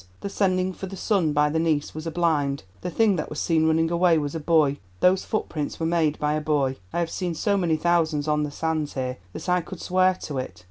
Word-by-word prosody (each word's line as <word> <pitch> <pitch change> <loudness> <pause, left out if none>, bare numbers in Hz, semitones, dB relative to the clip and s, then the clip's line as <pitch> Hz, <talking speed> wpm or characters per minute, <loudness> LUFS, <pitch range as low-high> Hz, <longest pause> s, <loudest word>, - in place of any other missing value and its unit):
The 200 - -4
sending 185 -2 +1
for 190 - -7
the 195 +1 -8
son 185 -6 +1
by 150 0 +2
the 160 - +1
niece 155 -3 0
was 155 +1 -6
a - - -2
blind. 150 - 0 0.2
The - - -3
thing 205 +1 +2
that - - -3
was 150 - -5
seen 160 -1 +2
running 160 +1 +2
away 170 -1 +4
was 145 -2 -2
a 165 - -3
boy—those 150 - +2
footprints 155 -8 -3
were 165 - -1
made 160 -3 +1
by 150 0 0
a 155 - -1
boy. 140 -4 0
I - - -4
have 170 -1 -1
seen 175 -3 -2
so 200 +5 +1
many 170 -5 +1
thousands 160 -3 +1
on 150 0 +2
the 150 - -1
sands 155 0 -2
here 130 -1 -3 0.2
that - - -7
I 180 0 +2
could 175 +1 -9
swear 185 0 +2
to 140 -3 -3
it. 130 - -6
160 Hz, 240 wpm, -25 LUFS, 150-180 Hz, 0.2 s, away